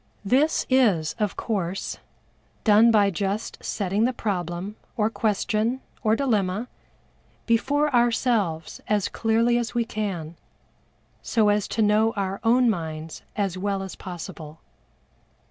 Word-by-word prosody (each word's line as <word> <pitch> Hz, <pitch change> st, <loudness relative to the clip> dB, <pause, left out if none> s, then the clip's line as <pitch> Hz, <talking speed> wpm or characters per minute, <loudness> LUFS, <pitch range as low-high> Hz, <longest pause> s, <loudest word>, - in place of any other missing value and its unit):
This 275 Hz, +9 st, +2 dB
is, 210 Hz, -, +3 dB
of 210 Hz, -3 st, 0 dB
course, 195 Hz, -4 st, -3 dB, 0.6 s
done 220 Hz, +1 st, +6 dB
by 205 Hz, -3 st, +4 dB
just 195 Hz, +4 st, -3 dB
setting 200 Hz, +2 st, 0 dB
the 255 Hz, -, +2 dB
problem, 185 Hz, -2 st, -3 dB, 0.2 s
or 215 Hz, 0 st, +1 dB
question, 220 Hz, +3 st, 0 dB, 0.2 s
or 220 Hz, -2 st, +3 dB
dilemma, 220 Hz, -4 st, 0 dB, 0.8 s
before 285 Hz, +5 st, +2 dB
ourselves 230 Hz, -9 st, +1 dB
as 210 Hz, -2 st, +1 dB
clearly 230 Hz, +2 st, +2 dB
as 235 Hz, 0 st, -4 dB
we 235 Hz, -1 st, +1 dB
can, 180 Hz, -8 st, -4 dB, 0.8 s
so 220 Hz, -3 st, +2 dB
as 205 Hz, -1 st, +1 dB
to 220 Hz, -, 0 dB
know 215 Hz, +2 st, +3 dB
our 195 Hz, -1 st, -2 dB
own 245 Hz, +2 st, +4 dB
minds 160 Hz, -6 st, -3 dB
as 195 Hz, -3 st, -1 dB
well 195 Hz, 0 st, -1 dB
as 190 Hz, -, -7 dB
possible. 165 Hz, -3 st, -8 dB
210 Hz, 125 wpm, -25 LUFS, 190-230 Hz, 0.8 s, done